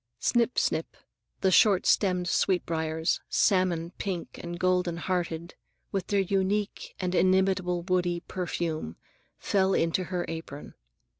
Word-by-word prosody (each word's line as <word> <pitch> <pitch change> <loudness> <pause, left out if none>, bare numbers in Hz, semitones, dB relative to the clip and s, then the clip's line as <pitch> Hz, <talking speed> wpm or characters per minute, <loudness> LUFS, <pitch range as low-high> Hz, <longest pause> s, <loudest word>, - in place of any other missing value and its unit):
Snip, 240 0 +1
snip; - - 0 0.4
the 190 - +3
short 195 0 +5
stemmed 180 -3 +2
sweet 180 +1 +1
briars, 160 0 -1
salmon 180 -4 +2
pink 185 -4 -4
and 175 0 -6
golden 180 -2 +1
hearted, 170 -2 -3 0.4
with 195 -2 -2
their 200 - +1
unique 195 +2 -1
and 185 -1 -2
inimitable 185 -1 +2
woody 180 -1 0
perfume, 165 - -3 0.4
fell 190 -1 +1
into 165 +3 +1
her 180 -1 -2
apron. 160 -3 -7
180 Hz, 125 wpm, -28 LUFS, 170-190 Hz, 0.4 s, short